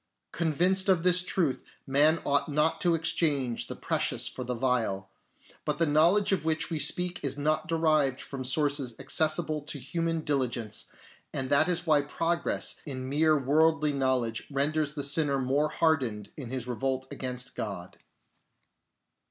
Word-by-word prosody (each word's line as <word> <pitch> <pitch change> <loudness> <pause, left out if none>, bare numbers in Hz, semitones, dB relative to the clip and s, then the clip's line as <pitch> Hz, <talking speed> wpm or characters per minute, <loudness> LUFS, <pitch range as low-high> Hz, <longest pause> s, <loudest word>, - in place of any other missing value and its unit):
Convinced 180 +4 +1
of 180 -3 +3
this 180 0 +5
truth, 175 -6 -1 0.2
man 150 +4 +3
ought 140 0 +1
not 150 +2 +1
to 175 -2 +3
exchange 145 -6 +1
the - - -6
precious - - 0
for 130 - -6
the 125 0 -3
vile. 115 -6 -1 0.5
But - - -2
the 165 - +2
knowledge 165 +8 +3
of 195 - 0
which 160 +1 -1
we 160 - -2
speak 180 +4 +2
is 140 -1 -1
not 155 +2 0
derived 155 -5 +2
from 135 -2 -6
sources 140 -2 0
accessible 155 +2 0
to 145 +1 -8
human 165 +4 -2
diligence, 125 -7 -2 0.5
and 130 -1 -4
that 140 +5 +4
is 175 0 0
why 155 -3 +4
progress 165 +4 -1
in 130 -2 -5
mere 155 +2 +3
worldly 150 +2 +2
knowledge 130 -4 0
renders 150 +2 0
the 145 - -3
sinner 145 0 +2
more 140 +4 +1
hardened 130 -12 0
in 130 -6 -8
his 130 -1 -3
revolt 130 +2 -2
against 125 -1 -5
God. 100 -5 -6
145 Hz, 150 wpm, -28 LUFS, 130-160 Hz, 0.5 s, this